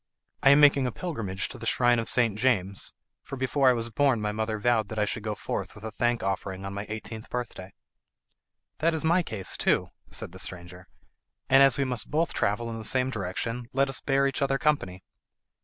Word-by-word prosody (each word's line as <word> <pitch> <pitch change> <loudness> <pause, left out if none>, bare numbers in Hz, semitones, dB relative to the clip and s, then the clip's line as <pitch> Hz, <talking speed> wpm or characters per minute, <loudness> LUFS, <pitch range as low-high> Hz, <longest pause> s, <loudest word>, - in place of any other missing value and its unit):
"I 135 - +6
am 140 +1 +7
making 140 -3 +5
a - - -2
pilgrimage 115 - -3
to - - -8
the - - -5
shrine 120 -1 +3
of 115 - -3
St. 115 -5 +2
James, 100 -5 0 0.3
for - - -7
before 130 +1 +2
I - - +5
was 115 -1 -2
born 135 0 +2
my 105 0 -1
mother 110 +1 -2
vowed 110 -1 +1
that 110 - -6
I 105 - +2
should 105 - -3
go 105 0 -3
forth - - -4
with 100 - -13
a 110 - -5
thank 120 +1 0
offering 95 0 -3
on 100 - -5
my 100 +1 -5
eighteenth 110 0 -7
birthday." 110 -6 -5 1.1
"That 165 +1 +2
is 160 - -2
my 170 +3 +3
case 110 - -3
too," - - +1 0.2
said - - -3
the 95 - -11
stranger, 90 -1 -5 0.6
"and, 135 +1 +7
as 135 -3 +5
we 140 - +2
must 125 -4 -2
both 160 +3 0
travel 105 +4 0
in 115 - -5
the - - -7
same 130 +3 +1
direction, 115 +3 -3
let 135 +1 +2
us 135 - -2
bear 135 0 +2
each 135 0 -1
other 135 0 +2
company." 95 -12 0
115 Hz, 215 wpm, -27 LUFS, 105-135 Hz, 1.1 s, am